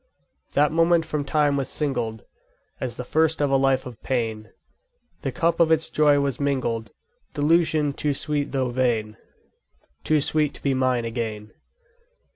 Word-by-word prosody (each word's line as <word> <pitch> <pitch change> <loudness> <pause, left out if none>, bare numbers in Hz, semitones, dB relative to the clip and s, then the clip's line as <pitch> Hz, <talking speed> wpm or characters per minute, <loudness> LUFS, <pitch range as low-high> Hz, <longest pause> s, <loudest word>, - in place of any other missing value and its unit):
_10 - - -30
3. - - -25
That 145 +1 +4
moment 165 0 +3
from 150 -2 -2
time 145 0 +1
was 135 - -2
singled 120 -8 -2 0.5
As 125 -2 -3
the - - -5
first 160 +2 +1
of 145 -2 +1
a - - +4
life 135 -1 +2
of 125 -4 -10
pain; 110 -4 -2 0.7
The - - -2
cup 170 -1 0
of 165 -1 +4
its 160 0 +2
joy 145 -1 +4
was 140 -3 -1
mingled 130 -5 -1 0.5
Delusion 155 -1 +2
too 145 0 -1
sweet 150 -1 -2
though 130 -2 0
vain! 115 -4 0 0.9
Too 155 -1 +2
sweet 150 0 0
to - - -14
be 140 - +1
mine 130 -2 +1
again. 110 -2 -4
140 Hz, 165 wpm, -24 LUFS, 120-150 Hz, 0.9 s, That